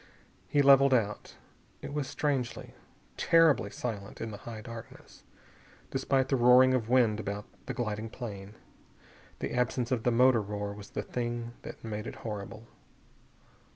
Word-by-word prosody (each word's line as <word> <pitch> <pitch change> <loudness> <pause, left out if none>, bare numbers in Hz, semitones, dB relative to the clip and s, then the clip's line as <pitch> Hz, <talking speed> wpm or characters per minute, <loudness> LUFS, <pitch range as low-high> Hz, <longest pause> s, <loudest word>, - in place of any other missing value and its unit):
He 145 - +3
leveled 135 -1 +7
out. 105 -3 -2 0.5
It - - -6
was 145 -2 -2
strangely, 135 -4 -2 0.4
terribly 165 -10 +4
silent 105 -3 -6
in 115 - -4
the 105 - -7
high 110 -2 -7
darkness, 115 -1 -11 0.7
despite 135 0 +1
the 135 - +3
roaring 125 +1 +6
of 120 -3 0
wind 120 -4 +3
about 100 0 -4 0.2
the - - -4
gliding 110 -1 -3
plane. 105 -4 -8 0.9
The - - -3
absence 125 0 0
of 125 -3 +1
the 125 - +2
motor 125 0 +5
roar 105 0 -4
was 100 -1 -11
the - - -4
thing 120 -1 -4
that - - -10
made 105 -1 -5
it - - -6
horrible. 110 +1 -6
115 Hz, 150 wpm, -30 LUFS, 105-130 Hz, 0.9 s, leveled